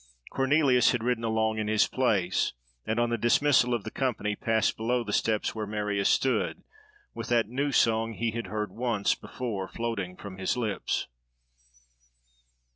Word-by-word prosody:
Cornelius 135 -2 +3
had 120 -3 -2
ridden 120 -1 0
along 110 -1 0
in 105 - -2
his 110 0 +3
place, 100 -8 +1 0.3
and, 110 +2 0
on 120 0 +1
the 115 - 0
dismissal 125 +2 +3
of 120 -4 0
the 110 - -6
company, 110 -6 -1
passed 110 +1 +1
below 120 +2 0
the 105 - -5
steps 110 -2 +1
where 110 -2 -4
Marius 105 -1 0
stood, 135 - +1 0.5
with - - -6
that 120 -2 +3
new 140 +5 -1
song 115 -2 +2
he 115 0 -1
had 115 -2 -4
heard 105 +2 -3
once 115 -4 0
before 105 -7 -5
floating 100 -6 -4
from 95 -2 -9
his 95 +6 0
lips. 110 -5 -1
115 Hz, 160 wpm, -28 LUFS, 105-120 Hz, 0.5 s, Cornelius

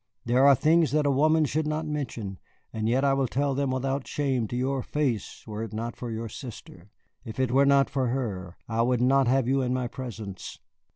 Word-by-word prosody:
There 125 +3 +4
are 140 - +8
things 160 +3 +3
that 150 -1 +2
a 140 - +3
woman 155 +3 +3
should 150 +2 -1
not 155 +1 -2
mention, 120 - -4 0.3
and 110 0 -1
yet 130 +3 +2
I 135 - +4
would 135 -2 0
tell 140 +2 0
them 140 0 0
without 135 +1 -2
shame 135 -6 -1
to 120 - -5
your 130 +2 0
face 130 -7 -2
were 110 -1 -5
it 115 -2 -5
not 115 +2 -4
for 120 - -6
your 115 0 -4
sister. 105 -5 -10 0.3
If 110 +2 -8
it 130 -2 +1
were 140 +2 +4
not 140 0 +5
for 135 -2 -1
her, 100 -8 -3
I 115 0 0
would 125 0 +2
not 135 +1 +3
have 130 0 +2
you 135 +1 +2
in 125 0 0
my 125 -1 -1
presence. 110 -6 -7
130 Hz, 220 wpm, -27 LUFS, 115-140 Hz, 0.3 s, are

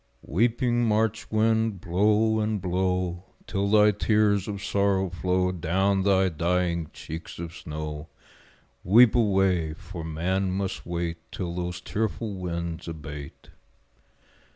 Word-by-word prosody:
Weeping 120 - +1
March 110 0 0
wind, 110 -1 +1
blow 105 +5 +2
and 105 -1 0
blow 90 0 -1 0.2
Till 100 0 -1
thy 105 0 +6
tears 105 -1 +2
of 100 -2 -5
sorrow 100 -3 +1
flow 90 +1 0
Down 95 +3 +1
thy 95 -1 +3
dying 85 0 0
cheeks 80 +1 -8
of 85 -1 -6
snow 75 -1 -6 0.7
Weep 110 +5 +6
away! 95 -8 +2
for 85 -2 -8
man 90 +4 -1
must 95 -2 -3
wait 85 -1 -2
Till 90 -3 -4
those 90 0 -4
tearful 105 +1 -2
winds 85 -2 -4
abate. 75 -3 -8
95 Hz, 120 wpm, -26 LUFS, 85-105 Hz, 0.7 s, thy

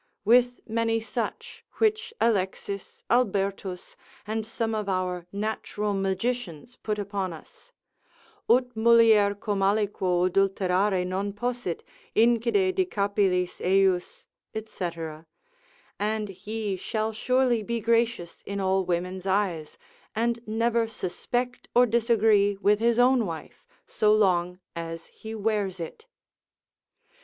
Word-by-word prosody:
with 245 +2 +4
many 225 0 +1
such, 225 +1 -5
which 440 +1 +1
Alexis, 200 -2 -1
Albertus, 195 -5 0 0.3
and 220 +1 -3
some 225 0 -2
of 210 -2 -2
our 180 -2 -2
natural 210 0 -2
magicians 195 +1 -2
put 210 -1 -3
upon 200 -2 -3
us: 165 - -14 0.8
ut 250 +1 +3
mulier 220 -3 +5
cum 205 -1 -2
aliquo 195 -3 +1
adulterare 190 0 +1
non 190 +2 -2
possit, 240 -4 -3 0.3
incide 240 - +3
de 375 0 +2
capillis 200 - 0
ejus, 190 -1 +1 0.4
&c., 185 -5 -4 1.1
and 215 0 -1
he 205 +2 -4
shall 220 +4 -2
surely 250 +1 +2
be 235 +3 -2
gracious 230 -5 0
in 200 0 -3
all 190 0 +2
women's 180 +1 -2
eyes, 185 -6 -1 0.4
and 235 +1 0
never 230 +1 +1
suspect 245 +5 -3
or 245 +1 +7
disagree 220 -3 +3
with 205 +1 +3
his 235 0 +2
own 245 -2 +4
wife 165 - -8 0.2
so 210 -1 +2
long 180 -4 +2 0.2
as 165 0 -6
he 220 0 -8
wears 205 -3 -1
it. 310 - -8
210 Hz, 115 wpm, -26 LUFS, 190-230 Hz, 1.1 s, or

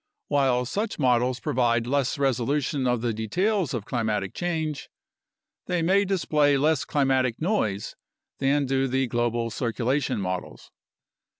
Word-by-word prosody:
While 130 -3 +2
such 205 - -3
models 125 -2 +2
provide 120 -2 +1
less 140 +2 0
resolution 135 +1 0
of 125 -2 +1
the 120 -1 -1
details 180 - 0
of 115 -6 -3
climatic 110 -5 -2
change, 160 -5 -3 0.8
they 180 -2 0
may 195 +4 +3
display 150 -6 +2
less 150 +1 +2
climatic 130 -4 +1
noise 110 - -1 0.4
than 140 +1 +2
do 135 0 +1
the 130 +1 +1
global 120 -1 -1
circulation 125 +2 -1
models. 90 -2 -5
130 Hz, 125 wpm, -25 LUFS, 120-150 Hz, 0.8 s, may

